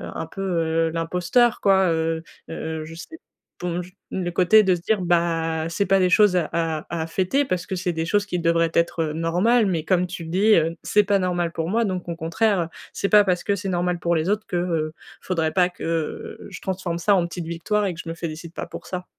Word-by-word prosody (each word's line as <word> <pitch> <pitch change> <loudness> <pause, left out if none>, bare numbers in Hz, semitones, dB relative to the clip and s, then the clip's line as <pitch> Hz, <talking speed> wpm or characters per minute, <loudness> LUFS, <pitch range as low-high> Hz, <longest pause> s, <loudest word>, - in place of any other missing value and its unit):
un - - -3
peu, 195 - -8
heu, 165 -3 +1
l'imposteur 180 +8 +1
quoi, 190 -1 +4
heu 160 0 0 0.3
heu, 160 -1 -4
je 160 +1 -10
sais, 320 - -10 0.4
bon, 175 0 -2
j 180 +1 -12 0.2
le 180 -2 -1
côté 185 +5 +5
de 190 -2 +3
se 170 - -8
dire, 215 +1 0
bah, 165 -2 +1
c'est 185 +4 0
pas 195 +1 +4
des 185 -1 +3
choses 200 0 +5
à 170 -4 +1
à 165 -2 -1 0.2
à - - -6
fêter 190 +12 +1
parce 185 -8 -2
que 190 - -4
c'est 180 -1 -1
des 160 0 -2
choses 205 +4 +1
qui 180 -3 -2
devraient 165 0 +2
être 170 -1 +1
normales, 180 +9 +2
mais 165 -4 -1
comme 180 0 +2
tu 175 -1 -7
le - - -8
dis, 200 +6 +4
heu, 165 +1 +1
c'est 210 - +3
pas 200 0 +3
normal 175 -2 0
pour 165 0 -2
moi 230 +4 +2
donc 185 -3 -3
au 170 - -3
contraire. 175 +2 +1 0.2
C'est 200 - -2
pas 210 -1 +7
parce 180 -3 0
que 200 - +1
c'est 195 0 -4
normal 175 -1 0
pour 170 0 +1
les 160 +3 -1
autres 210 +1 0
que, 175 - -2
heu, 165 -3 -1 0.3
faudrait 165 -4 -1
pas 180 -1 +3
que, 180 - -19
heu, 165 -1 -3
je - - -8
transforme 185 -3 -3
ça 200 +4 +3
en 180 -3 +2
petite 170 0 -6
victoire 200 +6 -1
et 185 - -1
que 170 - -12
je 165 - -7
me - - -3
félicite 165 0 -6
pas - - -5
pour - - -9
ça. 180 -1 -5
175 Hz, 240 wpm, -23 LUFS, 165-190 Hz, 0.4 s, pas